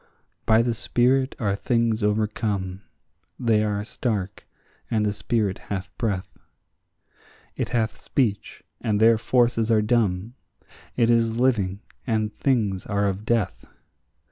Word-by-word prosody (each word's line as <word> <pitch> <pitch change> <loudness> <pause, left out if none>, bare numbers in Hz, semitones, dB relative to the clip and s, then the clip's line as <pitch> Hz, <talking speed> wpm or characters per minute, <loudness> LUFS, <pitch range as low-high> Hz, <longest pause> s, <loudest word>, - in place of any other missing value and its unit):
By 110 +1 +5
the 120 0 0
spirit 130 +4 +1
are 100 -5 0
things 115 +1 0
overcome; 105 -2 -1 0.6
they 110 -3 +2
are 105 -1 -1
stark, 105 -4 -3 0.4
and 110 -2 +1
the 105 - 0
spirit 105 -2 -1
hath 100 0 -4
breath; 100 -6 -3 1.2
It - - -2
hath 115 -3 -1
speech, 115 -7 -1 0.2
and 105 -2 0
their 110 0 +5
forces 120 -2 +2
are 110 -2 +4
dumb; 105 -2 0 0.6
it 120 -1 +4
is 115 -1 +2
living, 105 -7 +1 0.3
and 110 -2 0
things 105 -9 0
are 100 -1 0
of 100 +2 -3
death. 115 -4 0
110 Hz, 125 wpm, -24 LUFS, 100-115 Hz, 1.2 s, By